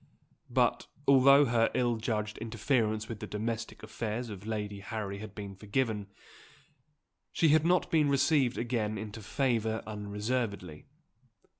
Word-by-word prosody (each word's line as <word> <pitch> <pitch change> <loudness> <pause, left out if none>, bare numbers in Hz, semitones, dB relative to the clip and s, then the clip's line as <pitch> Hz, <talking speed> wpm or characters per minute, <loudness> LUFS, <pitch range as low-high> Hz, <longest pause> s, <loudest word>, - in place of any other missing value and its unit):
But, - - +1 0.2
although 140 +1 +7
her 115 -2 +3
ill 120 -2 +1
judged 110 -1 -2
interference 110 -1 0
with 115 -3 -6
the 105 - -6
domestic 110 +2 -4
affairs 110 +1 -4
of 100 +1 -9
Lady 105 -2 -3
Harry 100 -1 -5
had 105 -1 -9
been 100 -2 -6
forgiven, 105 +1 -1 1.2
she 165 - +3
had 155 +2 +4
not 180 +1 +2
been 155 -3 +3
received 140 -2 +3
again 115 -3 -1
into 110 +1 -7
favour 110 -1 0
unreservedly. 105 -4 -3
110 Hz, 130 wpm, -30 LUFS, 105-125 Hz, 1.2 s, although